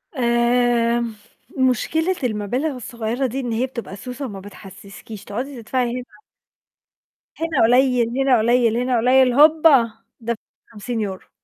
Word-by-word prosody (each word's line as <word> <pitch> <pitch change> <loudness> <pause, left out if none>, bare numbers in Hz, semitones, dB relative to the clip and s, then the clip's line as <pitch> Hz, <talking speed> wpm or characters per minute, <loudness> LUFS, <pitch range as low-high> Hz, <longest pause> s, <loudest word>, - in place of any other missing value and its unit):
امم، 235 -1 +1 0.4
مشكلة 315 +8 +1
المبالغ 245 +6 -2
الصغيّرة 240 +1 -3
دي، 255 +3 -4
إن 245 -3 -3
هي 230 +3 0
بتبقى 235 -6 -7
سوسة 250 +7 -7
وما 200 -6 -7
بتحسِّسكيش 200 +1 -12
تقعدي 245 +5 -6
تدفعي 245 +2 -1
هنا 245 -4 -8 1.2
هنا 325 -5 +1
قليّل، 250 0 +3
هنا 270 -2 +4
قليّل، 230 0 +2
هنا 250 0 0
قليّل 250 +2 +4
هوبّا 295 -4 +5 0.3
دَفَعتِ 235 -1 -3 0.4
50€. 210 -3 -5
240 Hz, 120 wpm, -21 LUFS, 225-260 Hz, 1.2 s, هوبّا